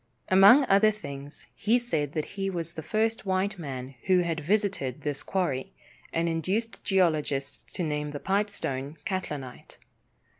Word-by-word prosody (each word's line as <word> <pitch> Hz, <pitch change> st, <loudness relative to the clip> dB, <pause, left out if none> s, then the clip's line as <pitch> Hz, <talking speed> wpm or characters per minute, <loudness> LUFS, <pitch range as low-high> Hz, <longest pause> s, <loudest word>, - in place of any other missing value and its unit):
Among 200 Hz, +9 st, +8 dB
other 200 Hz, 0 st, +5 dB
things, 145 Hz, -9 st, -8 dB
he 225 Hz, +4 st, +2 dB
said 155 Hz, -, -1 dB
that 155 Hz, -2 st, -1 dB
he 195 Hz, -1 st, -2 dB
was 170 Hz, -3 st, -4 dB
the 160 Hz, -, -6 dB
first 220 Hz, +6 st, 0 dB
white 190 Hz, 0 st, 0 dB
man 135 Hz, -4 st, -6 dB
who 185 Hz, -1 st, +4 dB
had 165 Hz, -2 st, -1 dB
visited 185 Hz, -, 0 dB
this 145 Hz, -2 st, -2 dB
quarry, 150 Hz, -9 st, -2 dB, 0.4 s
and 165 Hz, +1 st, 0 dB
induced 190 Hz, +8 st, -1 dB
geologists 150 Hz, -7 st, 0 dB
to 180 Hz, -, -1 dB
name 150 Hz, -1 st, -2 dB
the 145 Hz, -1 st, -5 dB
pipestone 165 Hz, -8 st, -2 dB
"Catlinite." 150 Hz, -10 st, -5 dB
170 Hz, 145 wpm, -28 LUFS, 145-200 Hz, 0.4 s, Among